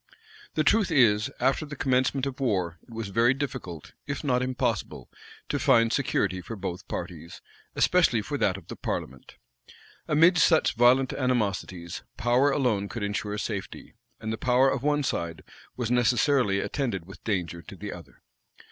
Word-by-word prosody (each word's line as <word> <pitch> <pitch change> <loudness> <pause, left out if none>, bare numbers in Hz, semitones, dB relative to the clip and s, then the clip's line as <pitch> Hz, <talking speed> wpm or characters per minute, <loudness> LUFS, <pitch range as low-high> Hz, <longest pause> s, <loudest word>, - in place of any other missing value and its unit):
[] - - -22
The 155 - +2
truth 210 +4 +3
is, 110 -9 +4
after 135 +3 +1
the 150 -1 -7
commencement 130 0 +1
of 135 -1 -5
war, 90 -10 -1
it - - -26
was 115 -2 -5
very 115 +6 +3
difficult, 130 - -6
if 145 +1 -4
not 125 -3 +1
impossible, 120 - -2 0.4
to - - -1
find 115 0 +4
security 100 -9 0
for 115 +6 -7
both 90 -3 -6
parties, 85 -1 -6 0.4
especially 165 -12 +3
for 145 - -4
that 95 -1 +1
of 90 - -14
the - - -7
parliament. 65 +1 -5 0.7
Amidst 165 +3 +5
such 160 -3 +3
violent 125 +2 +4
animosities, 100 -9 -2 0.2
power 120 +4 +3
alone 120 -8 0
could 115 -2 -5
insure 105 0 -2
safety; 105 -2 -5 0.3
and 110 +1 -4
the 110 - -5
power 130 +2 +3
of 135 - -2
one 145 +1 +1
side 85 -9 -3 0.3
was 120 -2 -2
necessarily 125 -3 +3
attended 115 - -2
with 95 -1 -13
danger 90 -5 -2
to 85 - -11
the - - -6
other. - - -14
120 Hz, 165 wpm, -27 LUFS, 100-135 Hz, 0.7 s, Amidst